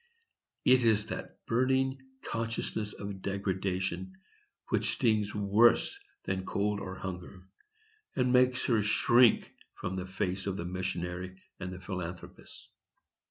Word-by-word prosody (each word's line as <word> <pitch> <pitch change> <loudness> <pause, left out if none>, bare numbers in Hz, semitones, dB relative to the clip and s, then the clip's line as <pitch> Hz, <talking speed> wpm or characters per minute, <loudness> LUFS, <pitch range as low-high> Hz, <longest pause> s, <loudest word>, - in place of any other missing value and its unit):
It 130 -1 +6
is 110 -2 +3
that - - -7
burning 130 +2 +1 0.2
consciousness 115 -2 -3
of 100 -1 -6
degradation 95 -1 -2 0.5
which - - +1
stings 105 -2 +1
worse 110 - +4 0.2
than 95 -1 -2
cold 100 +2 0
or 95 -2 -5
hunger, 90 -1 -7 0.7
and 125 -1 +2
makes 125 0 +4
her 115 -4 +3
shrink 120 +3 +4 0.2
from 95 - -4
the 90 0 -4
face 95 0 -2
of 95 -1 -1
the 85 - -4
missionary 90 0 -4 0.2
and 90 -1 -4
the 90 - -7
philanthropist. 90 -1 -7
100 Hz, 120 wpm, -31 LUFS, 95-115 Hz, 0.7 s, It